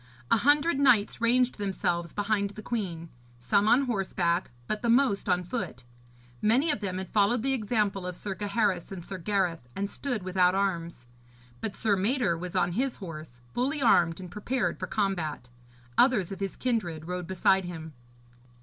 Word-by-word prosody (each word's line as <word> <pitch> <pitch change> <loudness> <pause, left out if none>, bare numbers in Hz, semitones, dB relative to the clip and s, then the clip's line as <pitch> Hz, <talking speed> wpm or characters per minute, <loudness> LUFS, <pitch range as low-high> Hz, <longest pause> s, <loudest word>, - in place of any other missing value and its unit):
A - - +6
hundred 290 +5 +3
knights 240 -7 +3
ranged 245 0 +2
themselves 175 -4 -1
behind 205 -1 0
the 215 +2 -10
queen, 175 -9 -3 0.3
some 200 - +2
on 250 +5 +5
horseback, 185 -6 0 0.2
but 215 +8 -2
the 235 - 0
most 235 -5 +3
on 180 0 +2
foot. 175 - -5 0.6
Many 260 +9 +3
of 290 - -2
them 185 -3 -3
had 190 -1 -6
followed 215 +3 +3
the 270 0 +1
example 210 -5 0
of 180 - -4
Sir 195 +2 -4
Gaheris 205 -2 -1
and 180 -3 -7
Sir 190 - -6
Gareth 175 -8 -1
and 200 - -1
stood 240 -1 -3
without 185 0 +3
arms; 170 -9 -2 0.5
but 215 -3 -4
Sir 210 -2 +2
Mador 205 -1 +1
was 175 +1 -6
on 175 - +2
his 255 +7 -1
horse, 155 - -9
fully 275 +5 0
armed, 175 -9 +4
and 180 -2 -8
prepared 235 +3 -1
for - - -3
combat. 180 - -2 0.5
Others 225 -9 +4
of 195 - -6
his 195 -1 -3
kindred 175 -11 -2
rode 180 0 -4
beside 190 +1 +2
him. 160 -3 -7
200 Hz, 170 wpm, -28 LUFS, 175-230 Hz, 0.6 s, A